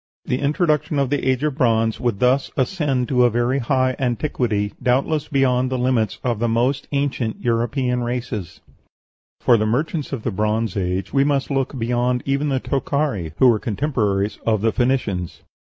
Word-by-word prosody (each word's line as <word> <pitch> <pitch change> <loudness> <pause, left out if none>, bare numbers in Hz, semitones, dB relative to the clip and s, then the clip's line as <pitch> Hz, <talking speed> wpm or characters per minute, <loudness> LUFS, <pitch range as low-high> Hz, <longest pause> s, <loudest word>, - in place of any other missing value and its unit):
The 125 - -1
introduction 150 0 +1
of 140 -1 0 0.4
bronze 115 -5 +1
would 120 -5 -1
thus 130 +2 +2
ascend 135 -2 0
to 125 -2 +3
a 120 - +5
very 120 +4 0
high 130 0 +1
antiquity, 120 -5 -1
doubtless 140 +4 +1
beyond 130 -3 +2
the 130 - -1
limits 125 -4 0
of 120 -4 -1
the 120 - +1
most 125 +4 0
ancient 140 -5 -1
European 125 +2 0
races." 120 -7 -4 0.8
For 120 - +5
the 110 0 0
merchants 145 +6 -1
of 130 -6 -4
the - - -1
Bronze 110 +1 -1
Age 95 -1 -2
we 135 -1 +4
must 140 -1 0
look 135 0 -1
beyond 125 +1 0
even 140 +2 0
the 135 -1 +1
Tokhari, 135 - -1
who 130 - +5
were 115 -3 +4
contemporaries 105 -5 -1
of 110 -3 +1
the 115 +1 +2
Phoenicians. 110 -8 -1
125 Hz, 160 wpm, -21 LUFS, 115-135 Hz, 0.8 s, a